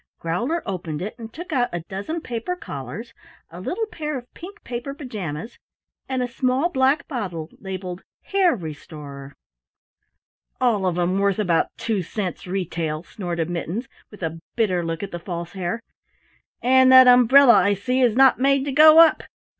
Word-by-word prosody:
Growler 240 - -2
opened 170 -5 -4
it 195 +5 -5
and 225 -1 -8
took 330 +4 -8
out 245 -3 +1
a 175 - -4
dozen 200 - -5
paper 245 +9 -4
collars, 225 - -8 0.4
a 175 +2 -9
little 405 - -2
pair 305 -9 -5
of 245 -1 -12
pink 395 +5 -11
paper 250 +3 -5
pajamas, 215 - -6 0.5
and 260 -1 -1
a - - -2
small 255 +5 0
black 275 +1 +1
bottle 180 - -5
labeled 185 -2 -6 0.2
"Hare 380 -5 +2
Restorer." 145 - -9 1.2
"All 220 -7 +2
of 175 -1 -1
'em 180 +2 +1
worth 200 -1 +1
about 180 -6 +1
two 220 -4 -1
cents 185 +1 -5
retail," 165 -4 -3
snorted 175 -3 -4
Mittens 175 +8 -4 0.2
with 210 -3 -12
a 165 0 -3 0.2
bitter 185 -7 +1
look 165 +2 -4
at 200 - -6
the 175 - -5
False 170 -1 -6
Hare. 185 +3 -3 0.8
"And 260 +1 +5
that 260 0 +9
umbrella, 250 +1 +7
I 200 0 +4
see, 250 +6 -1
is 240 -4 +3
not 265 -1 +5
made 275 +1 +2
to 285 - -2
go 310 +3 +7
up! 330 -1 +6
215 Hz, 165 wpm, -23 LUFS, 175-260 Hz, 1.2 s, that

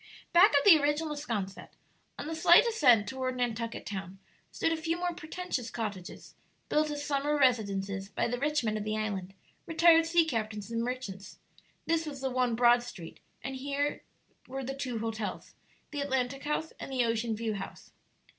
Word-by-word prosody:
Back 355 +4 +8
of 280 - +2
the 345 -6 +9
original 295 +1 0
'Sconset, 215 -10 -5 0.4
on - - -5
the 320 - -4
slight 340 +6 +6
ascent 255 - +4
toward 260 -1 -3
Nantucket 235 -1 -2
Town, 195 -1 -6 0.3
stood 325 - 0
a - - +2
few 325 +1 -2
more 350 0 -1
pretentious 315 -7 -4
cottages, 205 -6 -6 0.4
built 305 0 +2
as 290 -1 -4
summer 290 +1 0
residences 200 -7 +1
by - - -1
the 245 +1 -2
rich 295 0 +1
men 215 -1 0
of 210 - -3
the 215 0 -2
island, 195 -3 -3 0.3
retired 330 0 +5
sea 335 0 +4
captains, 220 -6 -3
and 230 0 -1
merchants; 235 -6 -5 0.5
this 325 -1 0
was 280 -2 -6
the 265 -1 -2
one 250 -2 +1
broad 240 +1 +5
street, 190 -9 -10 0.2
and 265 +1 -4
here 285 +2 -2 0.5
were 270 +1 -5
the 270 +2 -4
two 260 -4 -4
hotels, 220 -1 -4 0.4
the 290 -1 -3
Atlantic 265 0 -1
House 300 +2 -2
and - - -7
the 255 -2 +2
Ocean 230 0 0
View 220 0 -2
House. 195 -1 -8
255 Hz, 175 wpm, -30 LUFS, 220-300 Hz, 0.5 s, the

